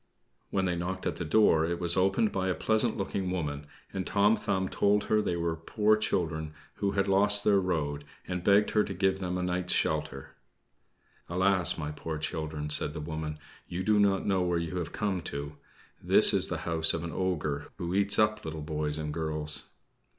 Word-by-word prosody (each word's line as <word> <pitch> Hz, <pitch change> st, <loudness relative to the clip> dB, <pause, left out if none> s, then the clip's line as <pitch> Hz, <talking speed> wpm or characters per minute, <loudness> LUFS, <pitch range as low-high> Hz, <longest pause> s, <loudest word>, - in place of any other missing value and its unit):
When 95 Hz, -1 st, 0 dB
they 90 Hz, -1 st, 0 dB
knocked 95 Hz, +2 st, -4 dB
at -, -, -2 dB
the -, -, -3 dB
door, 80 Hz, -2 st, +4 dB
it 85 Hz, +1 st, -2 dB
was 85 Hz, -1 st, 0 dB
opened 95 Hz, +3 st, +2 dB
by 95 Hz, -1 st, -1 dB
a 90 Hz, -, 0 dB
pleasant 110 Hz, +6 st, +1 dB
looking 95 Hz, -1 st, -2 dB
woman, 75 Hz, -5 st, -3 dB, 0.3 s
and 95 Hz, -1 st, -3 dB
Tom 105 Hz, +2 st, +3 dB
Thumb 95 Hz, -3 st, -1 dB
told 100 Hz, +2 st, +2 dB
her 110 Hz, 0 st, +2 dB
they 90 Hz, -, -1 dB
were 85 Hz, -1 st, -1 dB
poor 105 Hz, +6 st, +2 dB
children 80 Hz, -7 st, -2 dB, 0.2 s
who 100 Hz, -1 st, -1 dB
had 100 Hz, 0 st, +1 dB
lost 100 Hz, +1 st, +5 dB
their 100 Hz, -2 st, +4 dB
road, 75 Hz, -6 st, -2 dB, 0.2 s
and 90 Hz, -1 st, -3 dB
begged 100 Hz, +2 st, +4 dB
her 105 Hz, -, +3 dB
to 95 Hz, -, -5 dB
give 95 Hz, +1 st, +1 dB
them 90 Hz, -1 st, -3 dB
a 90 Hz, -, -2 dB
night's 90 Hz, 0 st, 0 dB
shelter. 75 Hz, -3 st, -1 dB, 1.0 s
"Alas, 95 Hz, 0 st, +2 dB
my 75 Hz, -2 st, -4 dB
poor 80 Hz, +1 st, -5 dB
children!" 75 Hz, -1 st, -4 dB
said 75 Hz, -, +2 dB
the 80 Hz, -, -5 dB
woman, 75 Hz, 0 st, -5 dB, 0.3 s
"you 90 Hz, +2 st, -4 dB
do 105 Hz, +1 st, +3 dB
not 100 Hz, -2 st, +2 dB
know 95 Hz, -2 st, +1 dB
where 90 Hz, -1 st, +1 dB
you 85 Hz, +2 st, -3 dB
have 85 Hz, -2 st, -3 dB
come 100 Hz, -4 st, -2 dB
to. 70 Hz, -1 st, -6 dB, 0.4 s
This -, -, +6 dB
is -, -, +2 dB
the -, -, -3 dB
house 80 Hz, -1 st, +2 dB
of 85 Hz, -, -4 dB
an 85 Hz, -, -5 dB
ogre 75 Hz, -5 st, -2 dB
who 85 Hz, -1 st, -4 dB
eats 100 Hz, +1 st, +2 dB
up 105 Hz, 0 st, +2 dB
little 80 Hz, -1 st, -5 dB
boys 75 Hz, -1 st, -3 dB
and 75 Hz, -1 st, -4 dB
girls." 75 Hz, -1 st, -3 dB
90 Hz, 200 wpm, -29 LUFS, 80-100 Hz, 1.0 s, This